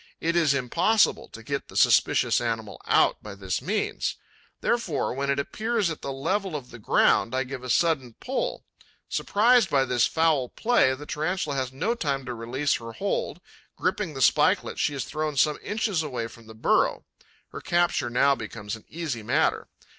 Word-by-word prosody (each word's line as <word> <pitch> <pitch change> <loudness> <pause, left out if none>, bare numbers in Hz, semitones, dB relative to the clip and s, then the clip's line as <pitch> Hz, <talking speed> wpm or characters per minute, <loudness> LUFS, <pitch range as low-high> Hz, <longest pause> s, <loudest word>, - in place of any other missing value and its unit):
It 165 +1 0
is 155 -5 +3
impossible 170 - +2
to - - -12
get - - -4
the - - -8
suspicious - - +4
animal - - -3
out - - +3
by - - -9
this - - -3
means. - - -2 0.4
Therefore, 190 - -1
when 140 +2 -2
it 140 - +1
appears 215 +6 -1
at 160 - -7
the 140 - -4
level 185 +7 -2
of 135 -4 -7
the 120 - -10
ground, 115 +3 +2
I 130 - +1
give 130 -1 -7
a 125 - -6
sudden 135 -4 +1
pull. 270 - -3 0.4
Surprised 235 +3 +3
by 135 -2 +3
this 125 -2 +2
foul 160 -6 +1
play, 220 - +2
the 145 +3 -10
Tarantula 155 0 -2
has 130 -2 -2
no 165 - -1
time 140 - -2
to 125 - -4
release 125 +5 -1
her 115 0 -9
hold; 205 - -3 0.3
gripping 170 -8 -2
the 135 - +1
spikelet, - - +3
she 145 - 0
is 135 - -3
thrown 155 -1 -3
some 150 +3 +3
inches 205 -5 -1
away 125 -7 -3
from 115 0 -12
the 110 - -12
burrow. 110 - +1 0.4
Her - - -8
capture 175 -8 +1
now 140 +4 +3
becomes 105 -5 -6
an 110 - -15
easy 155 -8 -4
matter. 105 - +1
140 Hz, 180 wpm, -26 LUFS, 130-175 Hz, 0.4 s, suspicious